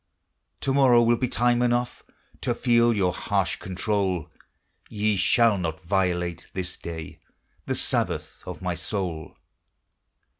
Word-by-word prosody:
To 135 - 0
morrow 130 -4 +5
will 120 +1 +4
be 125 - 0
time 120 0 +2
enough 120 0 0 0.4
To - - 0
feel 120 -1 +3
your 90 -3 +2
harsh 95 -3 -1
control; 95 -3 -2 0.6
Ye 105 0 0
shall 105 +2 +3
not 80 -2 -3
violate, 90 -1 -1
this 90 -1 -3
day, 80 -2 -8 0.5
The - - 0
Sabbath - - -1
of - - -7
my 90 -1 -1
soul. 85 -2 -4
95 Hz, 125 wpm, -25 LUFS, 90-120 Hz, 0.6 s, morrow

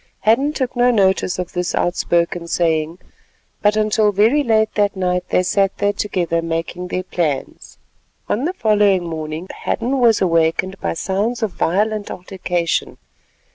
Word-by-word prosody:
Hadden 240 +8 +3
took 260 -4 -3
no 245 0 +4
notice 190 -5 +2
of 180 -1 -5
this 180 -1 -2
outspoken 170 -1 0
saying, 165 -1 0 0.6
but 210 0 +3
until 215 0 +2
very 220 +9 +3
late 220 -3 +2
that 205 -1 +1
night 180 -1 -1
they 180 - +2
sat 195 +1 +1
there 205 0 +1
together 175 -5 -1
making 165 +2 -4
their 185 0 -3
plans. 160 -6 -3 0.5
On 245 +7 -1
the 355 - -1
following 205 - +2
morning 160 +1 -5
Hadden 260 +3 -2
was 230 -3 +4
awakened 170 +2 +1
by - - -2
sounds 205 +7 -1
of 215 - 0
violent 210 +5 0
altercation. 180 -2 -2
190 Hz, 145 wpm, -19 LUFS, 175-215 Hz, 0.6 s, no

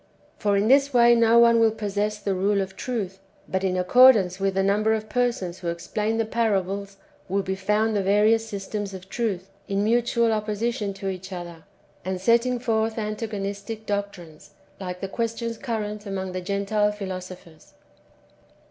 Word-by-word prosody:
^] - - -32
For 205 -2 +2
in 200 +2 +2
this 275 +1 +4
way 240 0 +7
no 230 0 +4
one 235 0 +6
will 225 -1 +5
possess 210 -1 -2
the 200 -1 -2
rule 200 +2 +1
of 190 0 -3
truth; 195 -5 -4 0.3
but 190 0 -2
in 185 -1 0
accordance 195 -1 +5
with 195 -1 0
the 195 - +2
number 210 +3 +2
of 215 0 -5
persons 235 -8 -1
who 175 - -6
explain 210 +6 -2
the 225 - +1
parables 200 -3 -1 0.3
will 195 +1 0
be 190 - -2
found 210 +3 0
the 200 - +2
various 210 +3 +3
systems 205 -1 -5
of 190 0 -11
truth, 195 -5 -3 0.2
in 200 0 0
mutual 235 +1 +2
opposition 215 0 -2
to 195 0 -4
each 190 0 -7
other, 175 -3 -8 0.4
and 185 0 -3
setting 235 +5 +2
forth 225 -2 -1
antagonistic 210 0 -4
doctrines, 200 -7 -5 0.2
like 180 -2 -6
the 195 - -2
questions 230 +2 -3
current 210 -2 -4
among 190 -1 -4
the 185 0 -4
Gentile 200 +2 0
philosophers. 185 -5 -8
205 Hz, 165 wpm, -24 LUFS, 190-225 Hz, 0.4 s, way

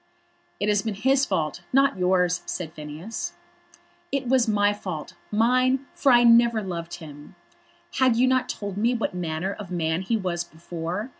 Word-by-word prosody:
"It 205 - 0
has 205 -1 +3
been 220 -2 -3
his 265 +6 +2
fault; 160 -6 -1
not 275 +1 +4
yours," 180 -1 +2
said 160 -3 -4
Phineas. 155 +8 -6 0.8
"It 275 -2 -1
was 255 -1 +3
my 205 -1 +3
fault, 180 -7 -6 0.2
mine; 255 +5 +2
for 275 - +3
I 240 -1 +6
never 235 -1 +5
loved 170 -3 -5
him. 150 -3 -12 0.6
Had 255 -3 +4
you 245 +3 +4
not 255 0 +1
told 200 -2 -5
me 235 +4 +2
what 230 - -2
manner 175 +2 -3
of 200 -3 -9
man 165 -1 -1
he 225 +4 0
was 175 -4 -2
before? 170 +6 -5
205 Hz, 165 wpm, -25 LUFS, 175-240 Hz, 0.8 s, I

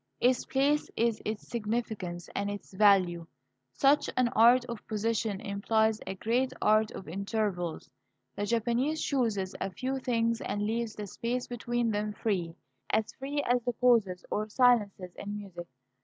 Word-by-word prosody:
Its 250 0 +2
place 285 +3 +1
is 230 -1 +1
its 215 0 -4
significance 210 -6 -3
and 200 0 -1
its 205 -1 -7
value. 185 -4 +4 0.4
Such 280 - +3
an 250 -2 +3
art 240 +3 +5
of 235 -3 -7
position 215 -1 -1
implies 220 +2 +1
a 190 - -3
great 245 +6 0
art 215 0 +3
of 190 - -9
intervals. 195 -2 -2 0.5
The 205 - -2
Japanese 240 +7 +1
chooses 220 -11 0
a - - -1
few 260 +8 -3
things 230 -2 0
and 205 - -2
leaves 225 +1 -2
the 210 - -5
space 240 +5 -3
between 240 -1 -1
them 210 0 -1
free, 180 -7 -2 0.3
as 220 0 0
free 285 +2 -3
as 245 0 +2
the 245 - -1
pauses 225 -7 +2
or 215 +1 -1
silences 210 -6 +2
in 205 +1 -5
music. 180 -4 -8
220 Hz, 155 wpm, -30 LUFS, 200-240 Hz, 0.5 s, art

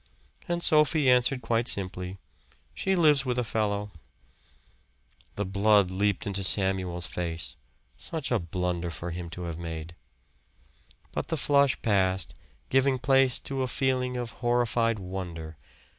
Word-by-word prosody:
And 175 -1 -1
Sophie 150 -3 +4
answered 125 +1 +3
quite 115 +1 0
simply, 90 -2 -3 0.6
"She 190 0 0
lives 150 -5 +5
with 125 -2 -2
a 125 - +1
fellow." 105 -2 -1 1.4
The 105 - -2
blood 100 0 +3
leaped 100 +1 0
into 100 -1 -1
Samuel's 95 -3 +1
face. 80 -8 -4 0.4
Such 160 -6 -4
a 120 - +3
blunder 90 0 -2
for 85 +1 -6
him 85 0 -6
to 90 +2 -7
have 85 -1 -5
made. 80 -1 -6 1.2
But - - -3
then - - -4
the - - 0
flush 140 -1 +3
passed, 95 -4 +1 0.4
giving 135 0 +3
place 135 0 +4
to 135 -1 -3
a 130 - 0
feeling 125 -1 0
of 120 -2 -4
horrified 120 -2 +1
wonder. 90 -4 -6
105 Hz, 140 wpm, -28 LUFS, 90-130 Hz, 1.4 s, lives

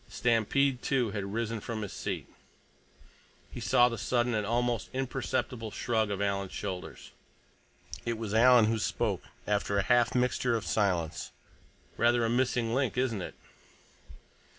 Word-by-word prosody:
Stampede, 125 +3 +1
too, 125 -6 +1
had 100 -1 -4
risen 115 0 -2
from 110 0 -4
his 100 - -6
seat. - - -4 1.3
He - - -7
saw 120 +1 +4
the 115 -2 -4
sudden 120 -1 +1
and 105 -2 -1
almost 120 0 0
imperceptible 130 -3 -2
shrug 110 0 0
of 100 -1 -2
Alan's 100 -1 -1
shoulders. 95 -3 -6 0.9
It 115 -1 -2
was 110 -2 -4
Alan 120 0 +6
who 110 +1 +1
spoke, - - -1 0.2
after 100 -1 0
a 100 - +2
half 120 +4 +3
mixture 125 -1 +1
of 110 - -3
silence. 90 -7 0 0.7
"Rather 120 0 +3
a 115 - 0
missing 120 -2 +1
link, 130 -1 0
isn't 120 -6 0
it? - - -7
115 Hz, 145 wpm, -30 LUFS, 105-125 Hz, 1.3 s, Alan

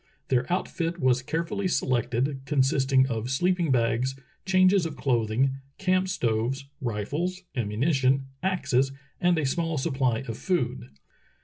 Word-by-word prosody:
Their 125 +3 +1
outfit 175 -1 -1
was 130 -2 +3
carefully 170 +8 -2
selected, 130 -2 0
con 145 -2 +2
sisting 130 0 +3
of 115 -1 -3
sleeping 175 +4 +1
bags, 125 +1 +1 0.3
changes 185 -1 +4
of 155 - -9
clothing, 125 +1 +1 0.2
camp 185 0 +1
stoves, 125 -2 -1 0.2
rifles, 145 - -2
ammunition, 130 +4 +1 0.2
axes, 135 -8 +1 0.3
and 180 -2 +3
a 155 - +1
small 165 +3 -1
supply 130 -5 0
of 115 - -5
food. 125 - -1
135 Hz, 125 wpm, -27 LUFS, 125-170 Hz, 0.3 s, changes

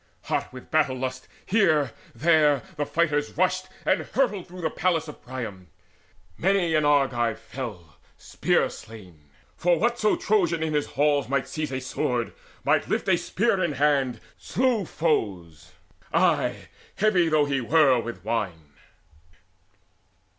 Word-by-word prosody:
Hot - - -2
with 125 0 -12
battle 150 -4 +2
lust 130 0 -4 0.2
Here, 155 - +3 0.2
there, 150 0 +3
the 145 -1 -2
fighters 150 -3 0
rushed 185 +1 +1 0.2
and - - +2
hurried 210 -9 -1
through 180 +1 -10
The 160 -2 -1
palace 165 -3 0
of 150 - -10
Priam. 110 -8 -7 0.7
Many 190 -2 +2
an 155 -1 +3
Argive 130 -6 +2
fell 110 - -8 0.2
Spear - - +1
slain; 90 -10 -13 0.3
for 175 0 +2
whatso 235 +1 +2
Trojan 175 -6 +1
in 155 -1 -1
his 150 -1 0
halls 145 -3 +1
Might 140 -1 0
seize 155 -3 -4
a 130 - -2
sword, 125 -2 -2 0.3
might - - +2
lift - - -1
a - - +5
spear - - 0
in - - 0
hand, 135 -4 +1 0.2
Slew 245 -5 0
foes 95 - -2 0.4
ay, - - +1 0.3
heavy 190 -5 +3
though 155 -2 +3
he 140 -2 -1
were 135 -1 +4
with 115 -5 -7
wine. 90 -10 -3
145 Hz, 140 wpm, -25 LUFS, 120-170 Hz, 0.7 s, a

